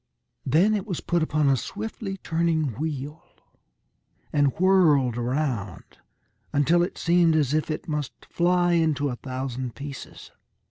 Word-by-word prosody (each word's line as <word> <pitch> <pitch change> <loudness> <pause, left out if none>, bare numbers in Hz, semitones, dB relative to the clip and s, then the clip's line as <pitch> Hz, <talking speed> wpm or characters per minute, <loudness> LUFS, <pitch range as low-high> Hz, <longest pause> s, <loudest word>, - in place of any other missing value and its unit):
Then 170 +11 +4
it 205 0 -2
was 180 -5 -3
put 175 -1 0
upon 155 -2 +1
a 135 - +4
swiftly 205 - -5
turning 160 -6 0
wheel, 150 -1 -4 1.1
and 145 -1 +4
whirled 160 -10 +4
around 120 - -3 0.5
until 155 +5 +3
it 175 - -2
seemed 170 -1 +3
as 145 -3 +1
if 155 +1 0
it 155 - -4
must 150 -3 -4
fly 175 0 +2
into 155 -4 +1
a 125 - -3
thousand 130 -2 -5
pieces. 140 -1 -9
155 Hz, 135 wpm, -25 LUFS, 135-175 Hz, 1.1 s, Then